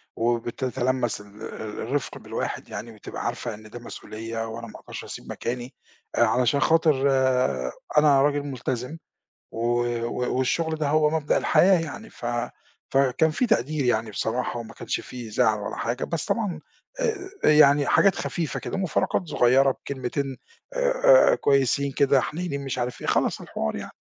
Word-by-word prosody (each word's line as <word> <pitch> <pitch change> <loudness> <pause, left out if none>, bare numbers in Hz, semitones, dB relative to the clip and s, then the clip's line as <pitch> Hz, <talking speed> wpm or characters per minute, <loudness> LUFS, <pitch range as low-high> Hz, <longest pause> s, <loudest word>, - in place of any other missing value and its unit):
وبتتلمّس 120 0 -1
ال - - -13 0.2
ال 110 -1 -6
الرفق 135 +3 -2
بالواحد - - -4
يعني، 115 +1 -6
بتبقى 110 - -8
عارفة 120 -3 -3
إن 110 +1 -12
ده 120 - -8
مسؤولية 115 -1 -6
وأنا 115 +1 -7
ما - - -11
اقدرش - - -8
اسيب - - -9
مكاني، 125 +2 -4 0.4
آآ، - - +2
علشان 125 +4 +2
خاطر 150 -3 +3 0.9
أنا 145 -2 +6
راجل 145 0 +2
ملتزم، 130 +1 -4 0.6
و 120 +1 +1 0.2
و 125 +1 -2
والشغل 160 +5 0
ده 150 -2 -1
هو 150 0 +3
مبدأ 155 -2 +1
الحياة 185 -2 +4
يعني، 150 -4 -7
ف - - -8 0.6
فكان 135 +3 +3
في 245 +10 0
تقدير 155 - +1
يعني 110 -2 +1
بصراحة، 120 +3 -2
وما 115 0 -9
كانش - - -3
في 120 -3 -8
زعل 105 0 +2
ولا 100 - -5
حاجة، 120 +2 -2
بس 165 -2 -3
طبعًا 210 -6 -1 0.4
آآ - - +2 0.4
آآ، - - +6
يعني 145 -1 +6
حاجات 195 -2 +4
خفيفة 165 -4 -3
كده، - - -4
مُفارقات 190 0 0
صغيّرة 135 +1 +4
بكلمتين 135 +1 -4 0.4
آآ، - - +5
آآ، - - +5
كويسين 140 0 +2
كده، 140 -1 +4
حنيّنين 155 -4 -4
مش 130 -2 -3
عارف 125 0 -3
إيه، - - -5
خلاص - - +1
الحوار 75 0 -3
يعني. - - -7
130 Hz, 160 wpm, -25 LUFS, 120-150 Hz, 0.9 s, أنا